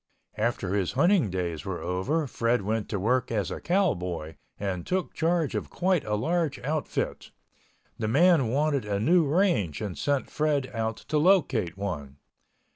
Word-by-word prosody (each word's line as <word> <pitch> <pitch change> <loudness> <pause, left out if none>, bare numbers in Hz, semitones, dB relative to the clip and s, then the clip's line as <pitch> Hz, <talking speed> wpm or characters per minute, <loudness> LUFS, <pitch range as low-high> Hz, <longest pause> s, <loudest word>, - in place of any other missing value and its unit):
After 105 -4 -1
his 100 -4 0
hunting 170 - +3
days 85 -4 -3
were 95 -2 -4
over, 95 - -1
Fred 120 -3 0
went 110 +1 -2
to 100 - -2
work 125 +5 +1
as 105 -5 -1
a - - -5
cowboy 90 - 0 0.3
and 95 -3 -2
took 185 0 -2
charge 165 -2 +1
of - - -3
quite 185 -2 +1
a 105 0 0
big 165 +5 0
outfit. 155 +1 -2 0.7
The 110 - -1
man 155 +2 +4
wanted 140 +2 +1
a 100 -1 -2
new 170 - +4
range 155 - +1
and 100 -5 -4
sent 140 -2 -1
Fred 145 -4 0
out 110 -1 -2
to 150 - -1
locate 145 - +2
one. 75 -9 -5
120 Hz, 160 wpm, -27 LUFS, 95-160 Hz, 0.7 s, man